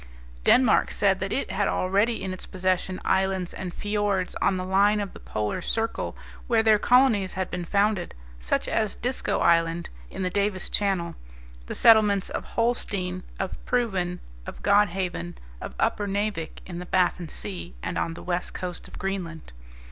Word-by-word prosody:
Denmark 255 - +5
said 195 -2 +2
that 195 0 -3
it 270 - -1
had 195 +1 +1
already 200 +4 +1
in 190 -1 -3
its 185 - -8
possession 185 0 -1
islands 190 -2 +1
and 185 -2 -5
fiords 205 -2 -1
on 190 - +2
the 185 - -3
line 200 +3 +3
of 200 -2 -4
the - - -11
polar 105 -1 -3
circle 225 0 -1 0.3
where 230 -2 +3
their 215 -1 +5
colonies 235 -6 +4
had 190 -1 -3
been 180 -1 -3
founded, 200 -1 +1 0.2
such - - 0
as - - 0
Disko - - -1
Island, 165 0 +2 0.2
in - - -5
the 180 - -1
Davis 200 -1 -1
Channel; 195 -4 0 0.5
the - - -4
settlements 210 -4 +5
of - - -3
Holstein, 200 -6 -1 0.2
of 190 - -4
Proven, 190 -8 0 0.3
of - - -8
Godhaven, 185 - +1 0.3
of - - -7
Uppernavik, 205 -4 -1
in 175 -2 -6
the 180 - -7
Baffin 180 -2 +1
Sea, 90 - -6
and - - -3
on 165 - -1
the - - -9
west 180 0 -2
coast 180 -2 -4
of - - -11
Greenland. 180 -4 -4
190 Hz, 165 wpm, -26 LUFS, 180-205 Hz, 0.5 s, Denmark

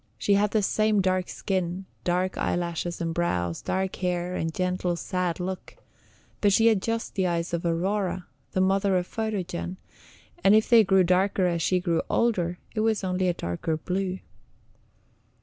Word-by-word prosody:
She 200 - +2
had 205 +1 +3
the 215 0 +1
same 215 +1 +2
dark 185 -1 +1
skin, 185 -1 -2 0.2
dark 180 +1 0
eyelashes 170 0 -2
and 165 -1 -1
brows, 90 - -1
dark 190 0 -2
hair, 180 -1 -1
and 165 -1 -1
gentle, 180 0 -1
sad 180 0 -2
look; 185 +1 -5 0.6
but 205 - +4
she 225 +3 +4
had 220 -4 +4
just 230 +1 -2
the 190 -2 +1
eyes 170 0 -2
of 170 - -1
Aurora, 185 +1 -1 0.3
the 185 - +2
mother 195 0 +2
of 180 - -1
Photogen, 190 -4 -3 0.7
and 200 - +6
if 220 - +4
they 230 -2 +7
grew 190 -1 +4
darker 185 +2 +2
as 170 -2 0
she 180 +3 +2
grew 170 -2 0
older, 180 -7 +1 0.2
it 215 - -2
was 220 -2 +1
only 185 0 0
a 175 - +2
darker 85 - -2
blue. 185 +3 -2
185 Hz, 165 wpm, -26 LUFS, 175-195 Hz, 0.7 s, they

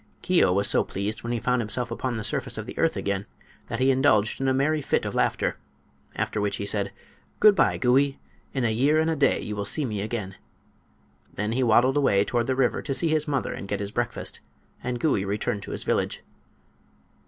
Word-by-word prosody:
Keo 180 - +3
was 100 +2 +2
so - - +3
pleased 100 +3 -4
when 120 - -4
he 120 - 0
found 125 +1 +1
himself 115 +2 -1
upon 120 0 -2
the 110 - -4
surface 125 -2 -2
of 110 - -4
the - - -8
earth 165 0 +2
again 100 0 -2 0.4
that - - -3
he 130 +1 +4
indulged 130 -5 +2
in 135 - +1
a - - +3
merry 150 +4 +1
fit - - 0
of - - -3
laughter, - - 0 0.6
after 105 - -2
which 100 -1 0
he 100 - -4
said: 100 -1 0 0.5
"Good 215 -1 +7
by, - - +2
Gouie; 135 +2 +2 0.3
in 130 -3 -1
a 115 - +2
year 140 +7 +3
and 160 +1 +2
a - - 0
day 140 -2 +2
you 105 - -5
will 100 - -2
see 140 +9 +1
me 105 -5 -3
again." 105 -3 -4 1.0
Then 105 +2 -2
he 125 +3 0
waddled 125 +3 +4
away 105 -8 +3
toward 120 +1 0
the 130 - +1
river 130 -2 +1
to 135 - -2
see 165 - +1
his 155 0 +1
mother 140 -2 -1
and 100 - -7
get 100 0 -2
his 100 0 -4
breakfast, 120 +1 -2 0.4
and 125 -1 -2
Gouie 140 -10 +1
returned 100 0 -2
to - - -8
his - - -3
village. - - -1
120 Hz, 220 wpm, -25 LUFS, 105-135 Hz, 1.0 s, Good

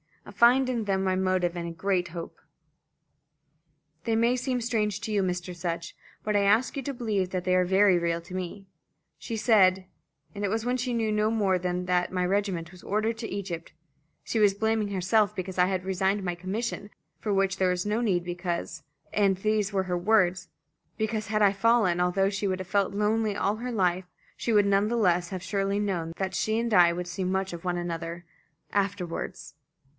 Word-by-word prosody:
I - - -10
find 245 +5 +5
in 235 -4 -1
them 195 -1 0
my 185 -1 +1
motive 185 -2 +1
and 170 -1 -4
a - - -4
great 180 +1 0
hope. 170 0 -8 1.7
They 225 - +1
may 235 +2 +3
seem 255 0 -1
strange 215 -4 0
to 220 - -4
you, 205 -1 +2
Mr. 180 -1 -3
Sutch; 170 -1 -4 0.3
but 210 -1 -1
I 205 - +4
ask 215 +5 +3
you 275 - -2
to 280 - -3
believe 215 -7 -1
that 185 -1 -3
they 185 - +1
are 180 0 +3
very 190 0 +4
real 170 0 -1
to 175 - -12
me. 185 +2 -5 0.5
She 230 - -5
said 195 -5 +4 0.5
it 205 0 -2
was 220 +3 -1
when 250 +1 +1
she 250 0 -2
knew 225 -2 0
no 210 0 +2
more 200 -5 +1
than 180 0 -2
that 180 -1 +1
my 180 -1 0
regiment 185 -3 -1
was 185 -1 -14
ordered 220 +2 -1
to 225 - -4
Egypt 180 -4 -5 0.5
she 225 - -1
was 205 -2 +5
blaming 220 0 0
herself 200 +2 +1
because 185 0 -5
I 180 - +6
had 185 -1 -2
resigned 190 +1 0
my 175 -1 -1
commission, 205 +4 -4 0.3
for 210 - -1
which 195 -1 +1
there 185 -1 +2
was 180 +1 -1
no 210 +2 0
need, 185 -7 +1
because 175 -2 -4 0.3
and 195 -2 +3
these 215 +1 0
were 190 -1 +1
her 180 -1 -2
words 185 -2 +2 0.5
because 220 -1 -2
had 215 +1 0
I 200 -2 +6
fallen, 200 -3 +2
although 180 +2 +2
she 200 0 -2
would 185 -1 -1
have 185 - -6
felt 200 0 +1
lonely 210 +1 +1
all 205 +1 0
her 250 +2 -4
life, 185 -4 +1 0.3
she 235 - -1
would 205 -1 +5
none 200 +1 +3
the 235 +2 -1
less 175 -5 +2
have 185 -2 -5
surely 195 +1 -1
known 175 -5 -2
that 190 -1 -2
she 220 +4 0
and 230 -1 -1
I 175 -3 +6
would 175 0 -4
see 175 +2 -4
much 190 0 -1
of 170 - -7
one 175 -1 0
another 170 0 -5 0.5
afterwards." 185 -6 -3
195 Hz, 205 wpm, -27 LUFS, 180-215 Hz, 1.7 s, I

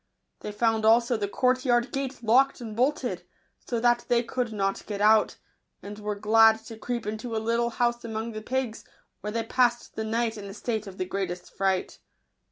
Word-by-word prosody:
They 210 - -6
found 225 +1 +1
also 235 +2 +4
the 205 -2 -1
courtyard 250 +1 +1
gate 270 -2 -4
locked 265 +5 +4
and 225 -3 -7
bolted, 250 - 0 0.4
so 235 - -3
that 240 0 +2
they 240 0 +2
could 245 -1 -2
not 195 -2 -1
get 205 -2 -4
out, 215 +1 +4 0.5
and 205 +1 -8
were 210 0 -3
glad 220 +2 +5
to 225 0 -9
creep 240 0 -3
into 220 +2 -4
a - - +1
little 230 +2 0
house 240 0 0
among 225 0 -4
the 215 -1 -6
pigs, 250 -1 -3 0.4
where 210 - -5
they 230 +1 -1
passed 240 0 +1
the 220 - -2
night 225 0 -1
in 200 - -8
a 195 0 -8
state 220 -1 -3
of 190 -1 -10
the 185 - -2
greatest 180 -2 -5
fright. 190 -1 -1
225 Hz, 190 wpm, -27 LUFS, 210-240 Hz, 0.5 s, glad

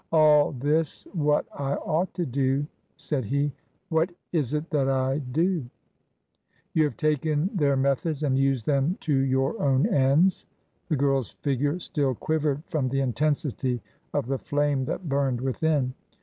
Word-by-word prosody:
" - - -45
All 150 -2 +5
this 150 +5 -1
what 150 -4 +2
I 140 0 0
ought 165 +4 -1
to 175 - -1
do," 135 +1 0 0.3
said 140 -4 -2
he; 140 +6 0 0.2
" 195 - -44
what 160 +1 +2 0.2
is 150 -4 0
it 150 +2 -2
that 140 -4 +2
I 135 +1 +1
do 160 +5 0 0.6
?" - - -43
"You 155 -1 +4
have 145 - -4
taken 155 +2 +1
their 140 -6 +2
methods 140 +3 0
and 135 -3 +2
used 135 -4 +1
them 145 +5 +1
to 155 - 0
your 135 +7 +1
own 135 -3 +3
ends." 145 +7 +3 0.4
The 155 - +2
girl's 135 -3 +1
figure 145 +3 -1
still 145 -6 -1
quivered 150 +1 -1
from 145 -6 -1
the 135 +1 0
intensity 135 -1 0 0.3
of - - -1
the 135 +1 -2
flame 145 -2 0
that 175 +6 -4
burned 135 -3 0
within. 135 0 0
145 Hz, 165 wpm, -26 LUFS, 135-155 Hz, 0.6 s, All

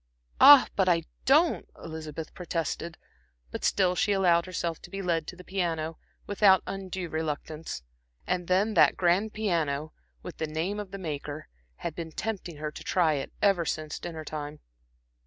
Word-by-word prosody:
"Ah, 285 -1 +10
but 190 -2 +3
I 165 -2 +3 0.2
don't," 310 +6 +3
Elizabeth 160 -1 -7
protested; 170 -1 -3 0.5
but - - -6
still 185 -2 +3
she 205 +3 +1
allowed 175 -3 +3
herself 170 -3 -3
to - - -11
be 195 - -6
led 170 -4 -1
to - - -7
the 180 - -12
piano, 165 -4 -2 0.3
without 200 -2 +4
undue 190 -2 -5
reluctance. 155 - -4 0.4
And 180 0 -1
then 195 +4 +2
that - - +5
grand 185 +5 +2
piano, 160 -8 -1 0.3
with 180 - -8
the 160 - -2
name 165 +7 -2
of 205 -2 -6
the 195 - -7
maker 150 -4 -5 0.3
had 170 - -5
been 165 0 -6
tempting 185 -4 -4
her 150 0 -4
to - - -10
try 170 -5 +2
it 140 -2 -3
ever 195 -4 +4
since 155 -1 -3
dinner 160 -3 -6
time. 150 0 -6
170 Hz, 165 wpm, -28 LUFS, 155-190 Hz, 0.5 s, Ah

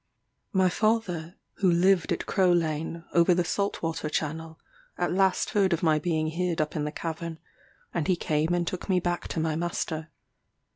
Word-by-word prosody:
My 190 -3 +3
father, 180 -4 0 0.2
who 190 - +3
lived 175 +1 +3
at - - -1
Crow 185 -2 +3
Lane, 165 0 -1
over 170 +1 +5
the 180 - +2
salt 200 +3 -2
water 165 -1 -2
channel, 160 +1 -3 0.4
at 175 0 0
last 190 0 +2
heard 195 -3 +3
of 170 - -1
my 155 -2 +4
being 155 -1 0
hid 170 +1 -1
up 155 +1 -1
in 150 -1 -1
the 150 - -2
cavern, 165 0 -5 0.6
and 165 -4 -1
he 185 - +3
came 155 -1 0
and 175 0 0
took 185 +4 -5
me 185 -1 +4
back 175 0 -2
to - - -3
my 160 -1 0
master. 160 -1 -3
170 Hz, 185 wpm, -27 LUFS, 160-180 Hz, 0.6 s, over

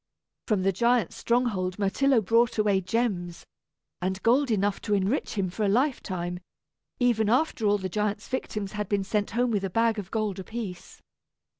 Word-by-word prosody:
From 210 -5 +1
the 195 - +3
giant's 235 0 +1
stronghold 215 -7 0
Myrtillo 230 +5 +2
brought 230 +4 +2
away 205 -3 +2
gems 185 -4 -2 0.6
and 190 +1 -1
gold 260 +4 +3
enough 205 -2 0
to 210 -2 0
enrich 200 +8 -1
him 195 -2 +1
for 215 - -3
a 200 - +2
lifetime, 190 - -1 0.6
even 230 -4 +2
after 250 -3 +1
all 205 0 +4
the 190 -2 -4
giant's 210 +2 -2
victims 210 -6 -3
had 210 -1 -4
been 200 -1 +1
sent 205 +1 -1
home 245 +1 0
with 205 -3 0
a 195 - -1
bag 225 +2 +1
of 195 -3 -7
gold 215 -4 -2
apiece. 195 -3 -7
210 Hz, 170 wpm, -27 LUFS, 190-235 Hz, 0.6 s, all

